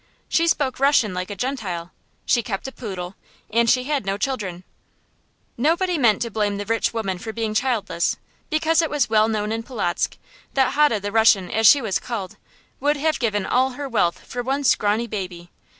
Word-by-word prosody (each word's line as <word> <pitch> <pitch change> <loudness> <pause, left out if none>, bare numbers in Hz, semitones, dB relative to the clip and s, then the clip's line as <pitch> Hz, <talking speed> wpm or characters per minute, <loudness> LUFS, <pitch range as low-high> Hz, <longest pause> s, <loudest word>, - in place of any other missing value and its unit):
She 335 +1 +2
spoke 275 -6 0
Russian 275 -7 +3
like 180 +1 -4
a 205 - -5
Gentile, 195 -7 -4 0.3
she 240 - +3
kept 205 +1 -4
a - - -6
poodle, 190 -7 -6 0.4
and 230 +1 +3
she 255 +1 +3
had 285 -2 -1
no 195 0 -2
children. 200 -7 -3 0.9
Nobody 340 +8 +1
meant 230 -4 +3
to 235 - -5
blame 205 -1 0
the 205 - -4
rich 225 +2 0
woman 195 -5 -3
for 220 - -5
being 220 -1 -3
childless, 215 -8 0 0.3
because 320 +2 +2
it 325 - -1
was 280 -6 0
well 215 0 +4
known 215 -1 -1
in 225 0 -2
Polotzk 215 -7 -2 0.4
that 265 -2 +3
Hode 280 -8 +3
the 205 - -3
Russian, 215 -5 +4
as 220 0 +4
she 280 +3 +7
was 200 -4 0
called, 215 -7 -5 0.4
would 290 +2 +1
have 310 +1 0
given 210 -5 0
all 260 +1 +2
her 285 +2 -5
wealth 205 -9 0
for 245 - -4
one 270 +3 -1
scrawny 215 -2 +2
baby. 180 -5 -6
225 Hz, 190 wpm, -22 LUFS, 200-265 Hz, 0.9 s, she